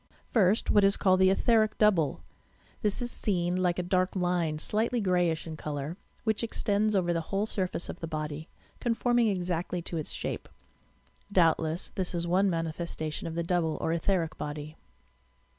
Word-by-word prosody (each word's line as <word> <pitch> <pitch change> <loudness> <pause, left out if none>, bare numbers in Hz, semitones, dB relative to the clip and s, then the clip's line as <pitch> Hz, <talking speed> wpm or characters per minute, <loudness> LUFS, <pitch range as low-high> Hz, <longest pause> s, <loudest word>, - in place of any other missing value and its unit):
First, 210 -1 +3
what 205 - +5
is 195 0 +4
called 185 -2 +3
the 190 0 +6
"etheric 215 +2 +3
double." 165 - +2 0.6
This 210 +3 0
is 240 - -3
seen 175 -3 0
like 180 -1 +1
a 180 - -1
dark 185 +1 +1
line, 175 -4 0
slightly 220 +9 +1
greyish 180 -5 +1
in 160 -1 -6
colour, 150 +1 -4 0.3
which 220 -2 +1
extends 215 -1 0
over 175 -2 +2
the 165 - 0
whole 200 +1 0
surface 185 -5 -2
of - - -7
the 165 - -4
body, 155 0 -4 0.3
conforming 240 0 +2
exactly 180 -2 -1
to 170 - -4
its 155 - -3
shape. - - -4 0.8
Doubtless 165 -2 +2
this 185 -2 -3
is 170 0 -1
one 190 +3 +3
manifesta 165 -2 -3
tion - - -5
of 165 - -5
the 170 - -1
double 165 -2 0
or 160 - 0
etheric 170 -1 0
body. 150 +1 -5
180 Hz, 170 wpm, -29 LUFS, 165-200 Hz, 0.8 s, the